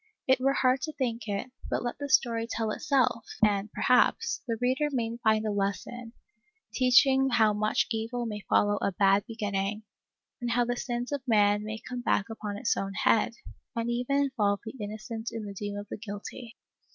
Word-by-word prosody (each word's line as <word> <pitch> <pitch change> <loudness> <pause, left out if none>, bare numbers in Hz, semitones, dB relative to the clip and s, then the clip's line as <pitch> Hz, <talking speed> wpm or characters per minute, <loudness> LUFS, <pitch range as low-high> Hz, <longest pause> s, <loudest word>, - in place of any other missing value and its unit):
It 260 0 +4
were 270 +2 +2
hard 255 -1 +2
to 310 0 -4
think 235 -5 -3
it; 205 +5 -3 0.2
but - - -1
let 240 - -4
the 285 0 -4
story 230 -3 +2
tell 225 -1 -1
itself, 255 -4 +1 0.2
and, 205 0 0
perhaps, 250 0 +2
the 230 -1 -1
reader 260 +4 +1
may 230 -3 -1
find 220 -2 +2
a - - 0
lesspn, 205 +4 -3 0.6
teaching 265 +1 +5
how 220 -4 +4
much 215 +3 +1
evil 230 +2 -2
may 210 -2 -4
follow 205 0 +3
a - - +1
bad 195 +3 +3
beginning, 205 -2 -2 0.6
and 240 - -2
how 240 +1 +2
the 245 +1 -1
sins 240 +1 -3
of 285 -1 -2
man 205 -2 +4
may 215 +1 -4
come 245 +2 -6
back 205 -3 +1
upon 210 -2 -5
his 230 +2 +1
own 195 0 -3
head, 230 +2 +2 0.4
and 230 0 -1
even 245 +3 0
involve 210 -7 0
the 220 - -6
innocent 220 +2 -5
in 225 -2 -5
the 200 - -6
doom 205 +1 -5
of 205 0 -6
the - - -5
guilty. 215 +3 -8
230 Hz, 190 wpm, -28 LUFS, 210-245 Hz, 0.6 s, teaching